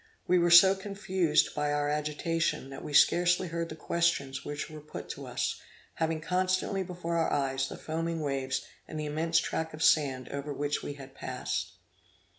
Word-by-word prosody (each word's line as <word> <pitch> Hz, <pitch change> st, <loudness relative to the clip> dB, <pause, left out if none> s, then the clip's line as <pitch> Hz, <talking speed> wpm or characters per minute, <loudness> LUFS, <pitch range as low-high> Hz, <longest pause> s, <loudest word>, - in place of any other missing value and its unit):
We 180 Hz, 0 st, +4 dB
were 175 Hz, 0 st, +3 dB
so 175 Hz, +3 st, +9 dB
confused 190 Hz, -5 st, +1 dB
by 150 Hz, 0 st, 0 dB
our 145 Hz, 0 st, +1 dB
agitation, 150 Hz, 0 st, -1 dB
that 135 Hz, -, -8 dB
we -, -, -6 dB
scarcely 175 Hz, +4 st, +4 dB
heard 170 Hz, 0 st, -3 dB
the 155 Hz, -, -6 dB
questions 160 Hz, -5 st, 0 dB
which 145 Hz, 0 st, -4 dB
were 155 Hz, -1 st, -10 dB
put 150 Hz, -, -8 dB
to -, -, -6 dB
us, -, -, -2 dB, 0.3 s
having 160 Hz, -1 st, -1 dB
constantly 185 Hz, +3 st, 0 dB
before 175 Hz, -2 st, -3 dB
our 165 Hz, -, +1 dB
eyes 135 Hz, -1 st, 0 dB
the -, -, -7 dB
foaming 165 Hz, +1 st, -3 dB
waves 135 Hz, -3 st, -2 dB, 0.2 s
and 155 Hz, -, -6 dB
the 150 Hz, -, -2 dB
immense 160 Hz, +3 st, 0 dB
tract 160 Hz, -1 st, -1 dB
of 155 Hz, -, -3 dB
sand 130 Hz, -5 st, +3 dB
over 140 Hz, +1 st, -4 dB
which 145 Hz, +1 st, -1 dB
we 145 Hz, -, -5 dB
had 135 Hz, -1 st, -11 dB
passed. -, -, -4 dB
160 Hz, 180 wpm, -30 LUFS, 145-170 Hz, 0.3 s, so